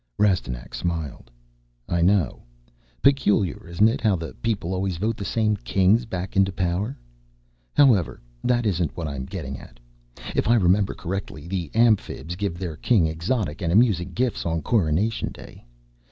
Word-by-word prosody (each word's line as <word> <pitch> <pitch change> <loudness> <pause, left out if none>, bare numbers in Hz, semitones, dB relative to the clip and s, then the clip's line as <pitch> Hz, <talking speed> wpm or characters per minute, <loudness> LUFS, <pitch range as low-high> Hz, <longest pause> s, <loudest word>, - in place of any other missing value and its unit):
Rastignac 85 -12 0
smiled. 80 -8 -4 0.6
"I 85 0 0
know. 90 -5 +2 0.6
Peculiar, 110 - +2
isn't 85 +6 +3
it, 115 - -1
how 105 -4 +3
the 80 -6 -6
'people' 95 -5 -1
always 95 -1 -1
vote 110 +5 -1
the 105 - -6
same 105 +3 +1
Kings 100 +4 +2
back 95 -2 -5
into 95 0 +3
power? 95 +7 -2 0.8
However, 115 - +4 0.2
that 120 -1 +2
isn't 90 -5 0
what 85 -3 -3
I'm 70 -3 -5
getting 70 -6 -6
at. - - -15 0.6
If - - +1
I 120 - +5
remember 100 -1 +3
correctly, 90 -4 -5
the 90 -4 -3
Amphibs 105 - +2
give 95 -3 -3
their 85 -4 -5
King 105 -5 +3
exotic 85 +2 -2
and 85 -2 0
amusing 95 -4 +3
gifts 125 +3 -1
on 80 -2 -2
coronation 105 +2 +1
day. - - -13
95 Hz, 155 wpm, -24 LUFS, 85-105 Hz, 0.8 s, I